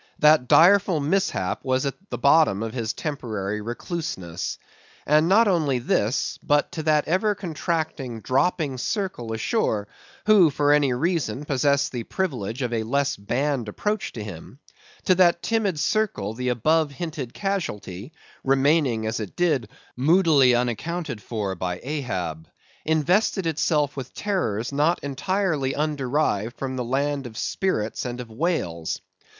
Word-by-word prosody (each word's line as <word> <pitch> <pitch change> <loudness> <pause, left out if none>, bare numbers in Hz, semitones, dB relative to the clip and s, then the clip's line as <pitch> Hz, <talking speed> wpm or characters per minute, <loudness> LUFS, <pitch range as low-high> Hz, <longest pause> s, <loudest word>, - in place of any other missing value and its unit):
That 150 -4 +5
direful 185 +1 +5
mishap 150 - 0
was 130 0 0
at 140 - -1 0.2
the - - -3
bottom 140 -8 +4
of 115 - -4
his 115 -3 -2
temporary 105 - -4
recluseness. 105 - -4 0.5
And 155 +3 +4
not 220 +4 +5
only 155 -9 +2
this, 120 0 0
but 145 0 +1
to 160 - -4
that 155 -1 +2
ever 190 +5 +2
contracting, 160 - -3
dropping 135 - 0
circle 185 - -3
ashore, 110 - 0 0.4
who, 205 -6 +6
for 145 0 +2
any 145 -3 +3
reason, 145 -2 -1
possessed 140 0 +1
the 120 - -3
privilege 125 - -3
of 120 -1 -2
a 115 - 0
less 140 +5 0
banned 125 +3 -1
approach 210 - -2
to 110 - -6
him; 100 +4 -9 0.5
to 185 - +5
that 175 -2 +3
timid 205 -5 0
circle 170 - 0
the 125 +2 -2
above 155 +6 +2
hinted 145 -3 -5
casualty—remaining, 135 - -1
as 110 +2 -2
it 105 -3 -6
did, 150 -11 +1 0.3
moodily 145 -3 +4
unaccounted 125 - -2
for 105 -3 -3
by 90 0 -3
Ahab—invested 145 - -1
itself 150 -2 +1
with 130 -2 -7
terrors, 125 - -1
not 150 +5 +2
entirely 145 -1 -1
underived 140 -6 -1
from 130 -1 -4
the 125 - -2
land 140 +2 -1
of 110 -2 -11
spirits 115 - -1
and 125 0 -5
of 120 -2 -8
wails. 110 - -2
140 Hz, 135 wpm, -24 LUFS, 115-165 Hz, 0.5 s, who